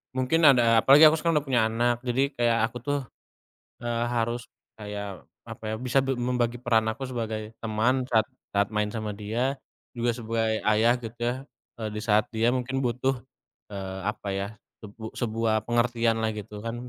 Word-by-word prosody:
mungkin 130 +5 +1
ada 120 -4 +6
apalagi 140 +6 +7
aku 155 +1 +7
sekarang 165 0 +1
udah - - -23
punya 120 -2 +4
anak. 120 +1 +1
Jadi 135 +4 +1
kayak, 120 -3 +1
aku 125 - -6
tuh, 145 +4 -1 0.8
eee, 120 0 -1
harus 120 0 -1 0.3
kayak, 105 -3 -6 0.2
apa - - -9
ya, - - -1
bisa 125 +2 -1
be 135 - -1
membagi 120 -1 0
peran 115 -3 +2
aku 135 +4 -7
sebagai 110 -3 -4
teman, 115 +4 +1
saat 110 -1 +3 0.2
saat 100 0 +2
main 105 0 0
sama 110 -2 -4
dia, 115 +6 -1 0.4
juga 120 0 +1
sebagai 115 -1 -1
ayah, 110 +3 +4
gitu 115 -1 -8
ya, 120 +1 +1 0.5
e - - -7
di - - -2
saat 105 -1 +3
dia 115 +2 +3
mungkin 130 +1 -1
butuh, 125 +2 0 0.6
eee, 95 -1 -5
apa 105 -1 -11
ya, 100 +1 -2 0.4
sebu 110 +1 -8
sebuah 115 -1 0
pengertian 120 -1 +2
lah, 110 - +1
gitu 105 0 -7
kan. 115 - -3
115 Hz, 175 wpm, -26 LUFS, 110-125 Hz, 0.8 s, apalagi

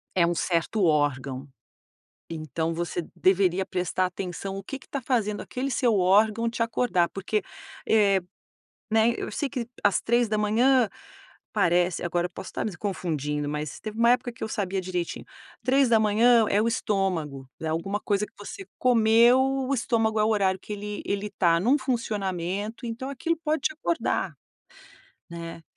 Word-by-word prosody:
é 175 -2 +4
um 170 - +1
certo 175 +4 0
órgão. 140 -3 0 0.8
Então 160 0 -3
você 170 0 -3
deveria 190 0 +2
prestar 185 +1 0
atenção 185 +1 -5
o 195 - -7
que 270 - -6
que - - -20
tá 275 - -4
fazendo 220 -5 0
aquele 265 +2 -4
seu 245 -3 +2
órgão 210 +5 +3
te 230 0 -2
acordar, 225 -6 +1
porque, 205 +2 -2 0.4
eh 200 -3 +4 0.7
né. 220 +1 +4
Eu - - -4
sei 285 - -2
que, 250 -4 -4 0.2
às 205 -2 +4
03:00, 235 +2 +3 0.7
parece 175 -3 +2
agora 175 0 0
eu - - -28
posso - - -8
estar - - -3
me 210 -5 -4
confundindo, 150 -7 -2
mas 150 0 -4
teve 215 0 -7
uma 235 +1 +6
época 245 0 +1
que 230 - -9
eu - - -1
sabia 195 -3 -2
direitinho. 180 -2 -4 0.4
03:00 235 -3 +4
é 205 - +3
o 225 - +1
estômago, 180 - -1
é 160 - -3
alguma 170 +6 -2
coisa 210 -1 0
que - - -28
você 365 - -9
comeu, 235 0 +5 0.3
o - - +2
estômago 225 -3 +1
é - - +4
o - - +2
horário 195 -3 +2
que 210 - -11
ele 205 0 -5
ele 200 +1 -2
tá 170 -4 +3
num 245 +10 +3
funcionamento, 210 -3 -2
então 235 +3 -5
aquilo 305 +5 -1
pode 315 0 -1
te 310 - +1
acordar, 330 +2 -1 1.0
né. 170 -1 -7
205 Hz, 160 wpm, -26 LUFS, 175-230 Hz, 1.0 s, uma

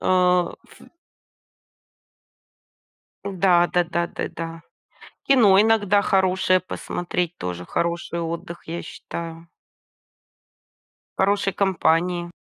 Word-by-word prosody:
А, 180 -1 +2
ф - - -19 2.5
Да 180 -3 +3
да 175 0 +3
да 170 0 -1
да - - -5
да. 165 0 -7 0.7
Кино 220 -8 +6
иногда 205 -2 +3
хорошее 190 -1 +2
2посмотреть- 175 0 -3
тоже 90 0 -5
хороший 170 0 -2
отдых, 170 +1 -5
я 170 +1 -5
считаю. 165 0 -8 1.7
В - - -2
хорошей 200 0 +1
компании. 175 -2 +1
175 Hz, 90 wpm, -23 LUFS, 170-190 Hz, 2.5 s, Кино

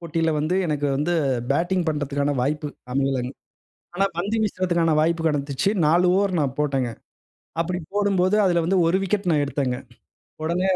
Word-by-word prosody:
போட்டில 165 -1 -1
வந்து 155 +5 0
எனக்கு 145 -2 -1
வந்து 150 +5 0 0.4
பேட்டிங் 175 +5 +1
பண்ணுறதுக்கான 145 -1 -1
வாய்ப்பு 150 +2 -1 0.2
அமையலங்க. 135 -2 0 0.6
ஆனா, 195 +2 +2
பந்து 205 +6 -1
வீசுறதுக்கான 175 -5 +1
வாய்ப்பு 165 +1 +1
கிடச்சிச்சு. 145 +2 0 0.2
4 170 +4 +4
ஓவர் 195 -3 +1
நான் 140 -3 -1
போட்டேங்க. 135 -4 0 0.7
அப்பிடி 180 +2 -1 0.2
போடும்போது, 200 -1 +2
அதில 175 -3 +2
வந்து 185 +3 +2
ஒரு 170 - +3
விக்கெட் 195 -1 -1
நான் 150 -2 +3
எடுத்தேங்க. 135 -2 -1 0.7
உடனே 175 +4 0
165 Hz, 145 wpm, -23 LUFS, 145-180 Hz, 0.7 s, 4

